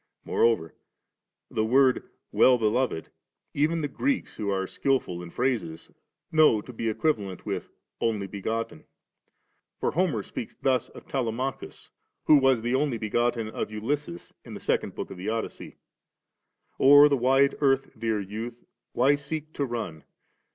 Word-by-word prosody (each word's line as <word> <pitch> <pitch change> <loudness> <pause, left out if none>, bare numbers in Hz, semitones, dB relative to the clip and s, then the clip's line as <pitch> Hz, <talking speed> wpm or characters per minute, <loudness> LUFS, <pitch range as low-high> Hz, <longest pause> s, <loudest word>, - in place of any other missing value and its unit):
Moreover, 110 -9 +1 0.8
the 110 - 0
word 130 +3 +3
* - - -54
Well 130 -1 +5
beloved 115 -5 0 0.2
' - - -55
even 165 +1 +1
the 145 - -1
Greeks 270 - -2
who 105 -2 -2
are 95 -1 0
skilful 125 -6 -1
in 90 - -8
phrases 115 -8 -2 0.4
know 155 -8 +5
to 125 +4 -10
be 115 0 -2
equivalent 110 - -1
with - - -4 0.2
' - - -53
Only 105 -4 0
b^otten.' 105 -3 -4 0.9
For - - 0
Homer 160 - 0
speaks 115 - -7
thus 130 -2 +1
of - - -13
Telema 130 0 -2
chus, - - -12 0.3
who 150 - +7
was 135 -4 +3
the 120 +1 0
only 135 -2 +1
begotten 115 +1 0
of - - -4
Ulysses, 110 -3 -4
in - - -9
the - - -7
second - - -1
book - - -5
of - - -8
the 95 +4 -4
Odyssey: 115 0 -5 1.0
O'er 145 +2 +8
the 145 - +2
wide 135 +2 +3
earth, 135 -1 +2
dear 110 -1 -1
youth, 110 +4 -6 0.3
why 130 +4 +4
seek 155 +2 -4
to 140 - -1
run. 110 - -5
120 Hz, 160 wpm, -27 LUFS, 110-135 Hz, 1.0 s, O'er